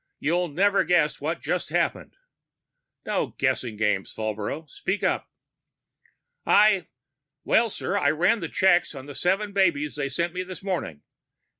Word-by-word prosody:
You'll 175 Hz, +4 st, +1 dB
never 195 Hz, +6 st, +2 dB
guess 170 Hz, -5 st, +2 dB
what 160 Hz, +4 st, -2 dB
just -, -, -2 dB
happened -, -, -1 dB, 0.5 s
" -, -, -56 dB
"No -, -, -2 dB
guessing 115 Hz, -4 st, -1 dB
games, 105 Hz, -3 st, 0 dB
Falbrough. 110 Hz, +8 st, -4 dB
Speak 190 Hz, +8 st, -3 dB
up." -, -, 0 dB, 1.1 s
"I 205 Hz, -4 st, +4 dB, 0.6 s
well, 230 Hz, 0 st, +3 dB
sir, 200 Hz, -, -3 dB
I 160 Hz, -, +3 dB
ran 175 Hz, +8 st, +2 dB
checks 180 Hz, -4 st, +3 dB
on 135 Hz, -1 st, -8 dB
the 145 Hz, -, -9 dB
seven 195 Hz, +7 st, 0 dB
babies 155 Hz, -7 st, +1 dB
they 140 Hz, -1 st, -2 dB
sent 170 Hz, +5 st, -2 dB
me 180 Hz, -, -3 dB
this 185 Hz, +1 st, -8 dB
morning. 170 Hz, -, -3 dB
170 Hz, 145 wpm, -25 LUFS, 140-190 Hz, 1.1 s, I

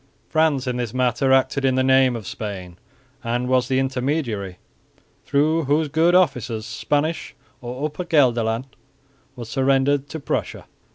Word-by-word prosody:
France 155 Hz, -4 st, +2 dB
in 125 Hz, -1 st, -2 dB
this 120 Hz, -1 st, -4 dB
matter 130 Hz, +1 st, +1 dB
acted 135 Hz, +1 st, +2 dB
in 130 Hz, -1 st, +2 dB
the 130 Hz, -, +2 dB
name 130 Hz, -1 st, +4 dB
of 110 Hz, -3 st, -6 dB
Spain, 95 Hz, -4 st, -7 dB, 0.4 s
and 120 Hz, +1 st, -1 dB
was 125 Hz, -1 st, +2 dB
the 130 Hz, 0 st, 0 dB
intermediary 130 Hz, -, -2 dB, 0.7 s
through 155 Hz, +3 st, +2 dB
whose 150 Hz, +2 st, +1 dB
good 165 Hz, +4 st, +3 dB
offices 120 Hz, -, +1 dB
Spanish 150 Hz, +8 st, -2 dB, 0.3 s
or 125 Hz, +4 st, -4 dB
Upper 155 Hz, +4 st, -4 dB
Gelderland 120 Hz, -7 st, +2 dB, 0.7 s
was 120 Hz, -3 st, -8 dB
surrendered 135 Hz, +2 st, +1 dB
to 160 Hz, -, -5 dB
Prussia. -, -, -3 dB
130 Hz, 145 wpm, -22 LUFS, 120-145 Hz, 0.7 s, name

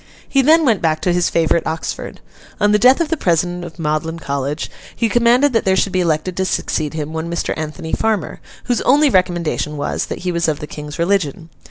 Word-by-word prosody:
He 275 Hz, -, +3 dB
then 315 Hz, +4 st, +5 dB
went 225 Hz, -7 st, +2 dB
back 155 Hz, -1 st, +1 dB
to 180 Hz, -, +1 dB
his 175 Hz, 0 st, +1 dB
favourite 165 Hz, 0 st, +1 dB
Oxford. 160 Hz, 0 st, -5 dB, 0.4 s
On 205 Hz, 0 st, +3 dB
the 210 Hz, -, +4 dB
death 255 Hz, -, +5 dB
of 325 Hz, -, 0 dB
the 325 Hz, -, 0 dB
President 175 Hz, -, 0 dB
of 170 Hz, -1 st, -9 dB
Magdalen 160 Hz, +1 st, -2 dB
College, 140 Hz, 0 st, -3 dB, 0.2 s
he 230 Hz, -, +1 dB
commanded 240 Hz, +5 st, +3 dB
that 225 Hz, -, +2 dB
there 190 Hz, -1 st, +2 dB
should 190 Hz, 0 st, 0 dB
be 185 Hz, -, +1 dB
elected 170 Hz, +1 st, -1 dB
to 190 Hz, -, +1 dB
succeed 155 Hz, -4 st, -2 dB
him, 155 Hz, 0 st, -4 dB
one 160 Hz, +1 st, -4 dB
Mr. 170 Hz, -, -2 dB
Anthony 155 Hz, +1 st, -6 dB
Farmer, 220 Hz, -6 st, -1 dB, 0.2 s
whose 245 Hz, -2 st, 0 dB
only 285 Hz, +2 st, +4 dB
recommendation 175 Hz, -5 st, 0 dB
was, 145 Hz, -, -2 dB
that -, -, -5 dB
he 180 Hz, -, +1 dB
was 170 Hz, -1 st, 0 dB
of 155 Hz, -2 st, -1 dB
the -, -, -5 dB
King's 150 Hz, 0 st, -8 dB
religion. 170 Hz, -3 st, -1 dB
175 Hz, 215 wpm, -18 LUFS, 155-210 Hz, 0.4 s, then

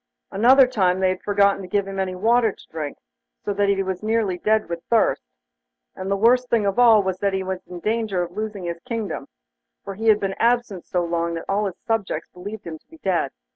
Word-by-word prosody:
Another 255 Hz, +7 st, +6 dB
time 190 Hz, -7 st, +1 dB
they 190 Hz, -1 st, +3 dB
had 185 Hz, 0 st, -3 dB
forgotten 200 Hz, -1 st, +2 dB
to 185 Hz, -, -8 dB
give 200 Hz, +1 st, 0 dB
him 195 Hz, 0 st, -5 dB
any 185 Hz, -1 st, -2 dB
water 225 Hz, +3 st, +3 dB
to -, -, -18 dB
drink, 155 Hz, -3 st, -5 dB, 0.5 s
so 205 Hz, -, -1 dB
that 200 Hz, 0 st, +1 dB
he 195 Hz, -1 st, +2 dB
was 190 Hz, -1 st, -4 dB
nearly 215 Hz, -4 st, 0 dB
dead 215 Hz, +2 st, +1 dB
with 170 Hz, 0 st, -5 dB
thirst; 230 Hz, -2 st, +3 dB, 0.7 s
and 190 Hz, -, -5 dB
the 200 Hz, -, +1 dB
worst 245 Hz, +4 st, +3 dB
thing 225 Hz, -3 st, +2 dB
of 200 Hz, +4 st, 0 dB
all 225 Hz, -4 st, +6 dB
was 190 Hz, -1 st, -2 dB
that 200 Hz, 0 st, 0 dB
he 190 Hz, 0 st, -1 dB
was 190 Hz, 0 st, -3 dB
in 180 Hz, -1 st, -8 dB
danger 215 Hz, -4 st, 0 dB
of 175 Hz, -, -7 dB
losing 210 Hz, 0 st, -5 dB
his 170 Hz, -1 st, -4 dB
kingdom, 220 Hz, -2 st, -4 dB, 0.6 s
for 195 Hz, -, -6 dB
he 220 Hz, +4 st, -4 dB
had 215 Hz, -1 st, +6 dB
been 195 Hz, -1 st, -2 dB
absent 235 Hz, -6 st, +1 dB
so 175 Hz, -1 st, 0 dB
long 170 Hz, 0 st, -1 dB
that 165 Hz, -, -6 dB
all 205 Hz, +1 st, 0 dB
his 190 Hz, -, -7 dB
subjects 205 Hz, -8 st, -2 dB
believed 200 Hz, +4 st, -8 dB
him 160 Hz, -2 st, -7 dB
to -, -, -40 dB
be 325 Hz, -, -16 dB
dead. 175 Hz, -7 st, +1 dB
195 Hz, 230 wpm, -22 LUFS, 185-220 Hz, 0.7 s, Another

